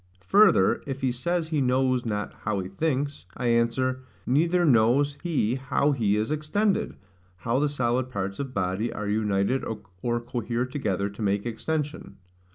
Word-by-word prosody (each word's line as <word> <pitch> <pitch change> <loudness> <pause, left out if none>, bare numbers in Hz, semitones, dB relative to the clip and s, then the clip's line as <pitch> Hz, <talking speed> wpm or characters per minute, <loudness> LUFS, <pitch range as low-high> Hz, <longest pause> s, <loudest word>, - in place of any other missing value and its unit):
Further, 195 - +5
if 135 -1 -4
he 130 -1 +1
says 160 +7 -1
he 155 -3 +1
knows 130 -1 +1
not 105 -1 -2
how 105 -2 -1
he 90 - -5
thinks, 140 - -2
I 125 - 0
answer, 125 +2 +1 0.2
Neither 170 +7 +2
knows 135 +2 +4
he 150 -10 0
how 135 +2 +1
he 110 -7 +1
is 110 +6 -1
extended, 190 +7 0 0.4
how 115 +7 0
the 150 0 +2
solid 125 -2 0
parts 100 -4 -4
of 135 -2 -3
body 100 +2 -1
are 105 - -4
united 105 +3 +1 0.4
or 120 -1 0
cohere 120 0 -2
together 105 -8 -2
to 100 - -10
make 100 0 0
extension. 150 +6 -3
125 Hz, 160 wpm, -26 LUFS, 110-145 Hz, 0.4 s, Further